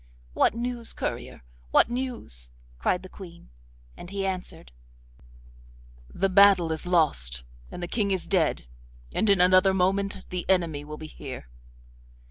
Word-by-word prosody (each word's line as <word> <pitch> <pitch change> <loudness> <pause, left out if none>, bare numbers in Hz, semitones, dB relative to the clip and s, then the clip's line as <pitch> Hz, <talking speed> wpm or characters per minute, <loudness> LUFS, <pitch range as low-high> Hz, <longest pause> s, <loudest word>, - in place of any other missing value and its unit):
'What - - +3
news, 240 0 -3
courier? - - -5 0.3
What - - +5
news?' 240 - -4 0.3
cried 180 - 0
the - - -8
Queen, 170 - -13 0.4
and 175 - -10
he 195 0 -3
answered: 185 - -5 1.4
'The 195 - +1
battle 190 -3 +6
is 160 +2 -3
lost 60 - +1 0.3
and 175 - -7
the - - -3
King 205 +1 0
is 190 -2 -1
dead, 170 - +1 0.5
and 220 - +1
in 200 -2 +5
another 185 +1 +5
moment 195 +1 0
the 180 0 -4
enemy 170 -6 +1
will 150 +1 -8
be 155 - -8
here. 130 - -9
185 Hz, 140 wpm, -26 LUFS, 155-200 Hz, 1.4 s, battle